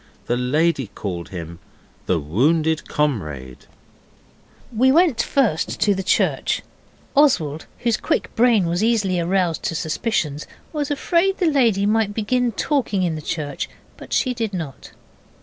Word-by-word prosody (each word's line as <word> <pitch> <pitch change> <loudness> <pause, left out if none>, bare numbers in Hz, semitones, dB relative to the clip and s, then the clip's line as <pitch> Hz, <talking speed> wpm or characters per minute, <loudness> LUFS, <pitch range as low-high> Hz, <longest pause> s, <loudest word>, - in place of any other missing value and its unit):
The 120 - 0
lady 140 +2 +1
called 85 -5 -5
him 85 -2 -7 0.5
'The 90 - +2
Wounded 155 - +1
Comrade'. 75 - -3 1.1
We 260 +4 +4
went 325 -4 +4
first 230 - 0
to 205 - +3
the 195 - -2
church. 190 - +1 0.5
Oswald, 160 - +2
whose 235 -3 +1
quick - - -1
brain 230 -5 +4
was 175 +4 0
easily 205 -6 +2
aroused 175 -1 0
to 165 - -1
suspicions, 160 -3 -2 0.3
was 295 -3 -2
afraid 340 +6 +1
the 365 - +1
lady 235 - +3
might 210 -1 +1
begin 245 +3 +1
talking 225 -6 0
in 170 -2 0
the 155 - -5
church, 150 -1 -4 0.3
but - - -13
she 255 - +1
did 225 -5 -3
not. 155 -7 -6
185 Hz, 140 wpm, -21 LUFS, 150-235 Hz, 1.1 s, We